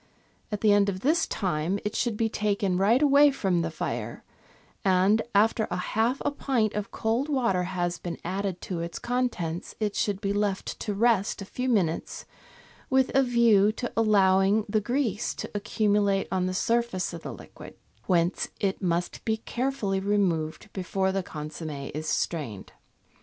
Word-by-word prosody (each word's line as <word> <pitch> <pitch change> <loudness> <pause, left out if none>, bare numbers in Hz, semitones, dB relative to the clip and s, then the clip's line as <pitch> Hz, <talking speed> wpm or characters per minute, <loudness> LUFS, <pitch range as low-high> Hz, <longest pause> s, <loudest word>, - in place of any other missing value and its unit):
At 210 - -3
the 210 -2 +5
end 205 0 +4
of 185 -1 -4
this 310 +8 +2
time 180 -2 -1
it 210 - -2
should 235 -4 0
be 225 - +2
taken 200 -4 0
right 230 +8 +4
away 290 0 +6
from 190 -10 0
the 165 - -1
fire, 165 - -4 0.6
and, 195 +3 +4
after 220 +1 +3
half 220 +8 0
a - - +2
pint 255 -7 0
of 210 -1 -3
cold 235 +6 -1
water 235 -11 +1
has 175 -1 -2
been 170 -2 -5
added 190 0 -3
to 180 -3 -4
its 170 0 -4
con 250 +1 0
tents, 170 -5 -5
it 210 -2 -1
should 200 -2 0
be 200 -1 -1
left 205 -2 -2
to 205 -2 -3
rest 210 -2 +2
a - - -9
few 255 +6 -3
minutes 180 -9 0 0.6
with 265 -1 +3
a 270 - +5
view 235 -5 +4
to 240 +2 -5
allowing 200 -1 +4
the 215 +1 +1
grease 235 -2 -1
to - - -6
accumulate 205 -1 +1
on 185 -1 0
the 185 - -2
surface 230 -5 0
of 170 - -7
the - - -6
liquid, - - -12 0.3
whence 175 -1 +1
it 195 -2 -1
must 175 -1 -1
be 220 -1 0
carefully 235 -4 -2
removed 190 -2 -1
before 190 0 -1
the 195 0 -1
consomm^ 150 -3 -6
is 155 +2 -4
strained. 140 - -2
200 Hz, 170 wpm, -27 LUFS, 180-225 Hz, 0.6 s, away